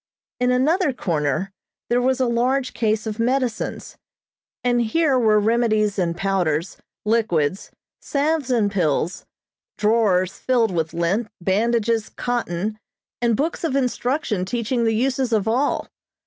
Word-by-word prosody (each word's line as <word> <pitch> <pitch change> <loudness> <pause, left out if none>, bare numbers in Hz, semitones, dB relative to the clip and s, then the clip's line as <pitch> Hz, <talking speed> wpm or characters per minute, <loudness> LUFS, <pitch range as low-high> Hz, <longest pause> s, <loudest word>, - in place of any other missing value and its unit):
In 250 0 +2
another 285 +5 +2
corner 165 - -1 0.4
there 245 +1 +2
was 260 +1 +1
a 260 - +3
large 250 +3 0
case 220 -1 0
of 215 0 -4
medicines, 245 -1 -1 0.7
and 245 -1 +2
here 270 +3 +2
were 215 -3 +4
remedies 215 -2 +1
in 170 -2 0
powders, 175 -3 -1 0.3
liquids, 195 -7 0 0.3
salves 290 -1 -1
and 225 -5 +2
pills, 170 -2 -1 0.5
drawers 210 -4 +2
filled 240 -5 +2
with 160 -2 -2
lint, 185 +7 0
bandages, 225 +4 +1
cotton, 215 -4 -3 0.4
and 235 -2 +2
books 315 +6 -2
of 310 -5 0
instruction 250 -5 0
teaching 235 +4 -1
the 225 -1 +2
uses 260 +1 0
of 215 -2 +1
all. 255 +6 0
230 Hz, 130 wpm, -22 LUFS, 195-250 Hz, 0.7 s, were